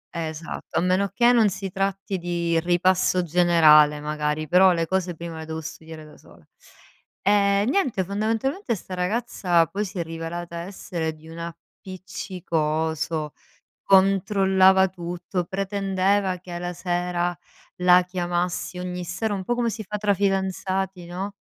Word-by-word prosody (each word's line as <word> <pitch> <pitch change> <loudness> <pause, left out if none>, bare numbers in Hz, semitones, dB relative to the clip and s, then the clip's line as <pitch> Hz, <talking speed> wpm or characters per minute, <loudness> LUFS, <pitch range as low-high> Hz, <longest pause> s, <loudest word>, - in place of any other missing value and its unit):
Esatto, 160 0 -5
a - - +3
meno 185 +2 +2
che 240 0 +4
non 225 -4 +4
si 195 -1 -5
tratti 195 0 -2
di 170 -1 0
ripasso 180 +1 +2
generale 155 -3 +5
magari, 150 +1 -2
però 185 +4 +6
le 165 -1 0
cose 180 -1 -1
prima 165 -1 -7
le 160 - -7
devo 160 0 -5
studiare 160 0 -9
da 150 - -15
sola. - - -20 0.8
E 200 0 +3
niente, 260 - +1
fondamentalmente 225 - -1
sta 185 -1 -9
ragazza 180 -3 +1
poi 200 +5 -3
si 195 +1 -8
è - - 0
rivelata 165 +1 -6
essere 170 -3 -4
di 155 +1 -15
un 165 - -9
appiccicoso, 165 -3 -4 0.5
controllava 190 -1 +4
tutto, 175 0 -4
pretendeva 195 0 0
che 180 0 -12
alla 175 +1 -4
sera 175 0 -2 0.4
la 180 0 +5
chiamassi 180 0 -2
ogni 180 -1 -4
sera, 200 +5 -2
un 190 -2 -3
po' 240 - 0
come 240 -1 0
si 220 0 -5
fa 210 - -4
tra 205 -1 +2
fidanzati, 190 -1 -1
no. 190 +3 -5
180 Hz, 140 wpm, -24 LUFS, 170-195 Hz, 0.8 s, però